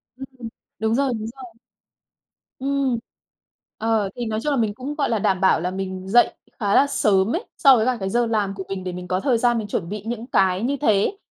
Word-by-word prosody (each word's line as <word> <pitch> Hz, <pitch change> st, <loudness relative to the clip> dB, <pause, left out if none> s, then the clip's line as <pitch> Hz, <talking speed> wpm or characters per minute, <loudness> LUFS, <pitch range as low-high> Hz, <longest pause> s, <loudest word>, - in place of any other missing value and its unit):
Ừm, 260 Hz, -3 st, -9 dB, 0.3 s
đúng 220 Hz, +1 st, +1 dB
rồi, 270 Hz, -1 st, +1 dB
đúng 215 Hz, 0 st, -5 dB
rồi. 265 Hz, -1 st, -9 dB, 1.1 s
Ừm. 275 Hz, -2 st, 0 dB, 0.8 s
Ờ, 220 Hz, -2 st, +1 dB
thì 240 Hz, -1 st, -3 dB
nói 220 Hz, 0 st, -2 dB
chung 295 Hz, -, -1 dB
là 280 Hz, -, +1 dB
mình 220 Hz, -4 st, 0 dB
cũng, 260 Hz, +6 st, -5 dB
gọi 295 Hz, -2 st, 0 dB
là, 225 Hz, -, +1 dB
đảm 190 Hz, -2 st, +1 dB
bảo 190 Hz, -4 st, +4 dB
là 180 Hz, +2 st, -1 dB
mình 190 Hz, 0 st, -5 dB
dậy 240 Hz, +4 st, +4 dB, 0.3 s
khá 205 Hz, -2 st, +1 dB
là 280 Hz, -, +6 dB
sớm 205 Hz, -5 st, +2 dB
ấy 355 Hz, -, -4 dB
so 270 Hz, -4 st, +7 dB
với 220 Hz, 0 st, +1 dB
cả 255 Hz, -1 st, +1 dB
cái 190 Hz, -, -2 dB
giờ 240 Hz, +3 st, +2 dB
làm 210 Hz, -3 st, 0 dB
của 195 Hz, -1 st, -6 dB
mình 190 Hz, -1 st, -5 dB
để 180 Hz, -, -3 dB
mình 180 Hz, 0 st, -7 dB
có 185 Hz, 0 st, 0 dB
thời 245 Hz, +1 st, +2 dB
gian 240 Hz, 0 st, +2 dB
mình 215 Hz, -, -3 dB
chuẩn 190 Hz, -4 st, -3 dB
bị 205 Hz, +1 st, -5 dB
những 235 Hz, 0 st, -4 dB
cái 190 Hz, -4 st, +2 dB
như 275 Hz, +4 st, 0 dB
thế. 220 Hz, -, +2 dB
220 Hz, 235 wpm, -22 LUFS, 195-255 Hz, 1.1 s, so